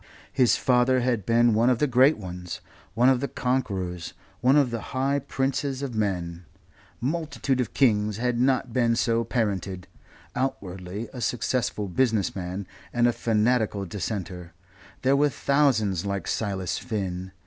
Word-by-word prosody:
His 125 -3 +4
father 125 0 +3
had 120 -5 0
been 120 0 +4
one 115 +3 +3
of 125 - +3
the 150 - +2
great 130 +3 +4
ones, 90 -3 -7 0.4
one 120 +3 +4
of 130 -1 +4
the 140 - -2
conquerors, 95 -11 -2 0.2
one 130 +2 +4
of 140 -5 +4
the 115 -1 -3 0.2
high 140 +2 +2
princes 135 0 -2
of 135 -3 -4
men. 90 -5 -2 0.6
Multitudes 140 -2 -1
of 120 - -5
kings 105 -6 +2
had 120 0 0
not 130 -2 +1
been 115 -2 +2
so 115 0 +1
parented. 95 -6 -2 0.5
Outwardly 100 -5 -3
a 125 - -6
successful 120 -4 -1
business 110 0 +1
man 95 +1 -4 0.3
and 120 0 +2
a 120 - +2
fanatical 110 -3 +1
Dissenter 90 -2 -5 0.5
there 135 +1 +4
were 145 +1 +3
thousands 125 - +2
like 100 -3 -3
Silas 95 -5 -2
Finn. 95 -4 -4
115 Hz, 150 wpm, -26 LUFS, 95-130 Hz, 0.6 s, His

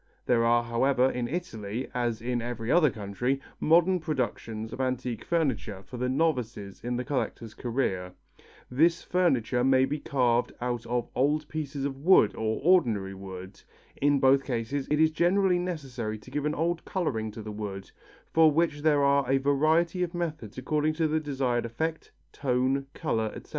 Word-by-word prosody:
There 120 -2 +3
are, 120 0 +3
however, 125 +2 +2
in 120 -1 -2
Italy, 120 - -4
as 120 -2 -2
in 120 0 -1
every 120 -1 -3
other 170 -4 +5
country, 115 +5 -2 0.2
modern 175 +3 +4
productions 115 -7 -3
of 130 - -4
antique 125 -2 -2
furniture 125 - -1
for 125 - -9
the 125 +1 -1
novices 125 -9 -1
in 120 0 -2
the 125 - -2
collector's 120 -5 -3
career. 115 -8 -2 0.6
This 165 +6 +3
furniture 130 -9 +1
may 130 0 +4
be 150 +3 -3
carved 125 -4 +1
out 120 -1 -3
of 120 0 -1
old 150 +3 +1
pieces 145 -3 -4
of 135 -1 -3
wood 155 - +5
or 110 0 -1
ordinary 115 - +3
wood. 95 0 -9 0.4
In 145 0 +3
both 135 +1 +4
cases 130 +2 -3
it 150 - +1
is 160 0 +4
generally 180 +3 +2
necessary 135 -11 -4
to 120 +4 -15
give 145 +1 -2
an 150 - -1
old 170 +2 -1
colouring 120 - -2
to 110 - -8
the 110 - -6
wood, 100 -2 -6 0.4
for 160 -1 +6
which 150 -1 +1
there 150 -2 +3
are 140 -2 +3
a 135 - +4
variety 155 +6 +2
of 175 0 -2
methods 155 -11 -4
according 150 +4 0
to 160 0 +1
the 155 +1 +1
desired 135 -5 -1
effect, 155 +8 -4 0.2
tone, 130 +1 0
colour, 110 -8 -1
etc. - - -10
130 Hz, 170 wpm, -28 LUFS, 115-155 Hz, 0.6 s, for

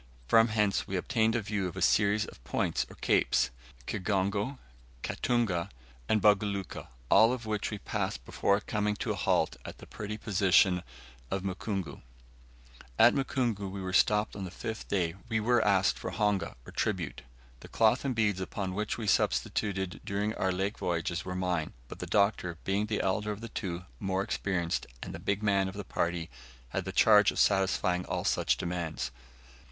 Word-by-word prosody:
From 115 - +6
hence 105 -3 +1
we 95 - -3
obtained 110 +3 +1
a 120 - 0
view 100 -2 -1
of 90 +1 -8
a - - -3
series 105 +1 +3
of - - -13
points - - -1
or - - -12
capes, 60 -1 +2 0.3
Kigongo, 100 +6 -1 0.5
Katunga, 110 -9 0 0.4
and 110 - +4
Buguluka, 100 -2 +1 0.2
all 110 +4 +7
of 125 -2 -4
which 105 -1 -1
we 105 - -4
passed - - -3
before 100 +1 +1
coming 105 -1 -1
to - - -2
a - - -1
halt - - +1
at - - -8
the - - -12
pretty 105 0 -6
position 95 -3 +3 0.5
of 95 -1 -2
Mukungu. 95 -1 -4 1.0
At - - +7
Mukungu, 120 -7 -1
where 95 0 -6
we 90 0 -4
stopped 105 +2 +3
on 100 - -5
the 95 - -4
fifth 110 +5 -6
day, 85 -5 0 0.2
we 110 -1 +1
were 120 +1 +3
asked 100 -1 +3
for - - -4
honga, 105 -2 0
or - - -10
tribute. - - -2 0.4
The - - -11
cloth 115 +3 +3
and 135 -3 -1
beads 105 -4 +1
upon 95 0 -3
which 105 +2 -2
we 115 - -4
subsisted 95 -1 0
during 105 +2 -1
our 95 - 0
lake 95 +3 -2
voyage 85 0 -1
were 90 0 -5
mine, 90 -4 -1
but - - -9
the - - -5
Doctor, 100 -4 +1
being 100 +2 0
the 105 -1 0
elder 105 +2 0
of 105 - -5
the 115 - -6
two, 90 -4 -4
more 95 -1 0
experienced, 90 -4 -1 0.2
and - - -7
the - - -6
"big 100 +1 -1
man" 100 -2 +3
of 95 - -6
the 100 - -5
party, 85 -3 -2 0.4
had 95 +6 -3
the 95 - -3
charge 105 +1 +6
of - - -4
satisfying 95 -2 +2
all - - -2
such - - +2
demands. 85 -7 -3
100 Hz, 180 wpm, -30 LUFS, 95-105 Hz, 1.0 s, all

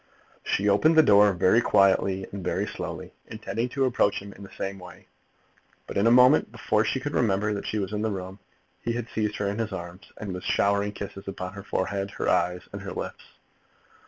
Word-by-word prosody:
She 100 - 0
opened 130 +11 +4
the 160 - +7
door 105 -2 +6
very 95 +6 +3
quietly 95 -2 +3
and 100 -2 -6
very - - -1
slowly, - - -6
intending 110 +2 -4
to 135 +1 0
approach 115 -5 +2
him 100 0 -10
in - - -15
the 100 - -10
same 95 0 -4
way. 90 -1 -13 0.8
But - - -8
in 100 +3 +3
a - - +6
moment, 125 +1 +6
before 110 -2 +1
she 125 +4 -1
could 145 +2 -4
remember 105 -1 +1
that 100 - -5
she 110 - -2
was 100 0 -3
in 105 - -2
the 110 - 0
room, 95 0 -6 0.4
he 120 - -2
had 120 -1 -4
seized 105 -1 -1
her 105 - -2
in 100 +3 -3
his 110 -2 -2
arms, 85 0 -8
and 100 -3 -5
was 90 - -6
showering 100 +1 +1
kisses 100 -1 -8
upon 90 -1 -5
her 100 - -8
forehead, 100 +1 -2
her - - -2
eyes, 90 +1 +1
and - - -6
her - - -6
lips. - - -6
100 Hz, 215 wpm, -26 LUFS, 95-110 Hz, 0.8 s, the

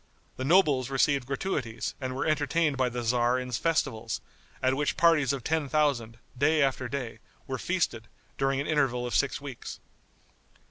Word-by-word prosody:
The 130 - -3
nobles 145 -5 +4
received 135 -1 +2
gratuities 135 -5 -2
and 130 0 -3
were 135 - -1
entertained 155 0 +1
by 130 -1 +1
the 120 0 -4
tzar 120 +1 +2
in 125 0 -4
festivals, 115 -5 -1 0.4
at 130 0 +2
which 145 +2 -1
parties 165 -6 +4
of 135 -3 -4
ten 155 -1 0
thousand, 135 -7 +1 0.2
day 150 +3 +3
after 130 -2 0
day, 130 -3 -4 0.3
were - - -4
feasted, - - -1 0.3
during 135 0 0
an 140 - -1
interval 135 -6 +1
of 120 - -4
six 140 - +1
weeks. 140 -4 -8
135 Hz, 165 wpm, -28 LUFS, 125-150 Hz, 0.4 s, nobles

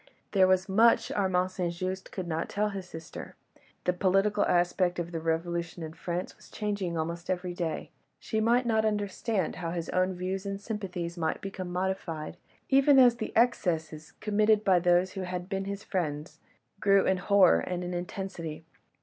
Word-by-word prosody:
There 190 -2 +5
was 185 +1 +2
much 225 +3 +4
Armand 185 -2 +1
St. 180 -2 -2
Just 185 +2 -4
could 185 -2 -5
not 165 0 -2
tell 210 +1 0
his 190 -3 -7
sister; 160 -1 -9 0.5
the 180 - +1
political 195 +3 +2
aspect 175 0 +2
of 175 0 -3
the 165 - -3
revolution 165 +1 -2
in 160 0 -6
France 175 +2 -4
was - - -18
changing 200 -5 -2
almost 170 +2 -4
every 180 -1 -2
day; 170 -2 -3 0.3
she 220 - -2
might 240 +3 +3
not 220 -2 +2
understand 205 -2 -1
how 165 - -3
his 170 -1 -4
own 185 0 +1
views 185 +2 -3
and 195 -1 -4
sympathies 185 -5 -5
might 160 -1 -1
become 195 -2 -6
modified, 180 -3 -3 0.3
even 275 +1 +5
as 245 -2 +7
the 220 - -4
excesses, 165 -10 0
committed 215 0 +2
by 190 -3 +4
those 175 +1 +3
who 190 - -5
had 180 -1 -4
been 195 -1 -2
his 200 0 -5
friends, 155 -4 -3 0.4
grew 195 -1 +4
in 190 - +2
horror 190 - +5
and 180 - -3
in 180 0 -4
intensity. 175 -3 -5
185 Hz, 175 wpm, -29 LUFS, 175-200 Hz, 0.5 s, as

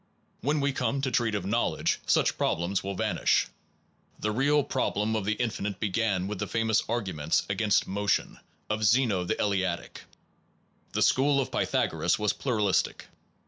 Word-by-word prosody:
When 145 +2 0
we 140 0 +1
come 130 +1 -1
to 130 - 0
treat 115 -2 +1
of 100 -3 -3
knowledge, 115 +4 0
such - - +3
problems 85 +4 -1
will 100 0 -4
vanish. - - +1 0.7
The 105 - -1
real 145 +6 +2
problem 110 -5 -1
of 105 -3 -2
the 105 - +1
infinite 105 -4 -3
began 100 -2 0
with 105 -2 -5
the - - -2
famous 115 -1 +1
argu 110 -4 -3
ments 75 +1 0
against 105 +1 +1
motion, 100 +1 -1 0.3
of 110 0 -2
Zeno 105 -4 +3
the - - -2
Eleatic. 95 -4 -2 0.9
The - - +2
school 140 +1 +3
of 135 - -2
Pythagoras - - +1
was 105 -1 +1
pluralistic. 105 -7 0
105 Hz, 155 wpm, -28 LUFS, 100-120 Hz, 0.9 s, such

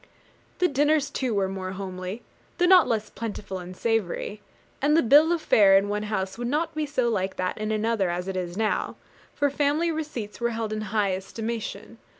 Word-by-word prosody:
The 360 - +3
dinners 290 -1 +2
too 255 -6 -1
were 195 -1 +1
more 190 -1 -5
homely, 185 +2 -6 0.3
though 355 - +3
not 365 -1 +7
less 220 -3 -1
plentiful 205 -4 -5
and 180 +1 -9
savoury; 215 -2 -1 0.4
and 300 +3 +4
the - - +4
bill 295 +7 +6
of 340 -2 0
fare 195 -2 +6
in 200 +1 +1
one 210 0 -1
house 190 0 -2
would 240 - -2
not 300 +6 -1
be 310 -1 -2
so 260 -4 0
like 190 -4 -1
that 185 +2 -2
in 215 0 -2
another 215 -3 +1
as 175 +1 -3
it 190 - -3
is 180 0 -4
now, 220 -1 0 0.4
for 285 -1 +1
family 295 +4 +1
receipts 295 -10 -5
were 235 - +2
held 225 -2 -3
in 215 - -3
high 205 -2 +1
estimation. 220 +4 -5
220 Hz, 195 wpm, -26 LUFS, 195-285 Hz, 0.4 s, not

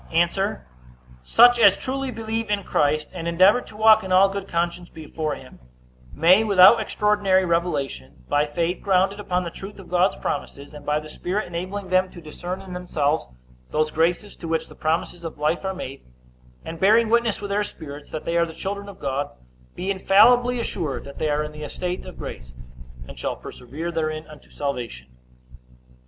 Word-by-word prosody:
A. 175 +5 +1 0.6
Such 240 - +6
as 200 -3 +6
truly 270 +1 -3
believe 225 -1 -3
in 205 -1 0
Christ, 150 -1 0
and 170 -2 -5
endeavor 185 +8 +5
to 210 - -13
walk 220 0 +6
in 190 - -6
all 190 +2 +6
good 195 0 -5
conscience 170 0 -2
before 155 -1 -4
him, 130 - -14 0.5
may, 180 +7 +5
without 200 +1 +7
extraordinary 205 -3 +2
revelation, 140 - -2
by 145 +1 +2
faith 170 +4 -2
grounded 195 +1 +2
upon 180 -3 -1
the 170 - -5
truth 195 +4 -9
of 190 -3 -12
God's 180 +2 +3
promises, 140 0 -5
and 145 -1 -11
by 150 0 +2
the 155 - -10
Spirit 185 +7 -3
enabling 185 +3 -5
them 185 0 +2
to 175 - -12
discern 175 +3 -6
in 185 -1 -9
themselves 160 -4 -1 0.4
those 155 0 0
graces 175 +6 0
to 170 - -7
which 165 0 -1
the - - -12
promises 165 +2 -2
of 165 -2 -6
life 155 +5 0
are 190 0 -2
made, 135 -7 -7 0.6
and 165 0 -7
bearing 220 +5 +5
witness 235 -1 +2
with 205 - -6
their 205 +1 +1
spirits 150 -7 -9
that 155 - -6
they 170 - 0
are 170 0 +3
the 160 - -10
children 200 +1 -5
of 195 - -11
God, 140 0 -2 0.5
be 190 +2 -2
infallibly 240 +6 +4
assured 170 - -3
that 140 - -10
they 155 - 0
are 150 +1 +1
in 150 - -6
the 150 0 -10
estate 180 +4 -4
of - - -10
grace, 65 0 -8 0.5
and - - -11
shall - - -2
persevere 145 +8 -7
therein 155 -1 -2
unto 150 -1 -15
salvation. 120 - -5
175 Hz, 185 wpm, -23 LUFS, 155-200 Hz, 0.6 s, without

